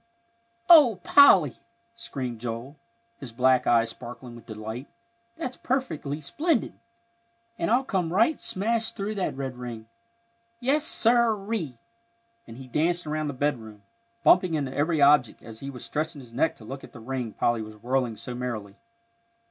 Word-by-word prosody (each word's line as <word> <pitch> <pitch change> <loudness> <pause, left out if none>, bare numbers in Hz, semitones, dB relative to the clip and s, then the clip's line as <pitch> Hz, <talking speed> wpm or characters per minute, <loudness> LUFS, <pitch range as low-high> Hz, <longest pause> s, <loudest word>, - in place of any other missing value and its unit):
"Oh, 280 - +7
Polly!" 185 - +6 0.4
screamed 130 - -6
Joel, 120 +4 -6 0.4
his 130 -4 -7
black 130 +2 +2
eyes 115 -1 +3
sparkling 120 +1 -10
with 115 -1 -14
delight, 110 +4 -7 0.5
"that's 255 -6 -5
perfectly 160 - -2
splendid! 295 - -1 0.9
and - - 0
I'll 245 +4 +3
come 185 -9 -1
right 225 - +2
smash 225 +3 -1
through 205 +2 -3
that 190 -9 -3
red 135 -2 -5
ring. 120 -3 -7 0.7
Yes, 280 +5 +1
sir 235 -8 +3
ree!" 195 - -4 0.7
and 115 - -11
he 135 - -9
danced 170 +7 0
around 155 0 -2
the 145 - -3
bedroom, 115 -7 -3 0.4
bumping 180 -3 +5
into 140 -3 -2
every 150 0 +2
object, 140 -4 +4
as 115 -1 -10
he 140 - -6
was 125 -4 -8
stretching 155 +5 -3
his 120 -3 -14
neck 150 +6 +1
to 110 - -14
look 135 +4 -8
at - - -13
the 120 - -11
ring 120 -1 -4
Polly 120 -1 0
was 110 0 -9
whirling 120 0 -1
so 115 +3 -6
merrily. 115 -5 -5
140 Hz, 155 wpm, -26 LUFS, 120-195 Hz, 0.9 s, Oh